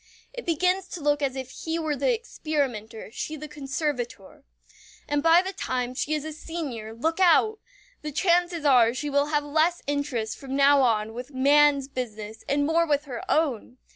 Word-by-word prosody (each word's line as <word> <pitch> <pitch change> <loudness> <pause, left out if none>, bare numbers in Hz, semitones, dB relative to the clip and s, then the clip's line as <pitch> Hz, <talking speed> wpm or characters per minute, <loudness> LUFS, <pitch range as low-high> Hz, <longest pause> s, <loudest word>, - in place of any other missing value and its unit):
It - - -8
begins 360 +3 +1
to 360 - -7
look 290 -1 +1
as 270 -2 -1
if 260 -1 -6
he 325 0 -4
were 315 -3 -1
the 285 - +1
experimenter, 275 - -3
she 310 +6 -5
the 305 0 -8
conservator. 275 -7 -4 0.6
And 290 0 0
by 330 +3 +5
the 380 +1 -5
time 250 -6 -2
she 290 +4 -1
is 300 0 -4
a 315 - -5
senior, 290 -9 -6
look 320 +10 -2
out! 385 +5 +4 0.4
The 305 - -5
chances 345 0 +1
are 245 -4 +5
she 290 +2 -3
will 285 +1 +2
have 295 -1 0
less 315 +4 +1
interest 280 -6 -2
from 270 -1 -5
now 280 0 +5
on 220 -3 +1
with 250 +4 -8
man's 280 +1 +4
business 220 -5 -6
and 285 +1 +2
more 335 +2 +2
with 290 -1 +1
her 250 -4 -6
own! 265 -6 0
290 Hz, 180 wpm, -26 LUFS, 255-320 Hz, 0.6 s, by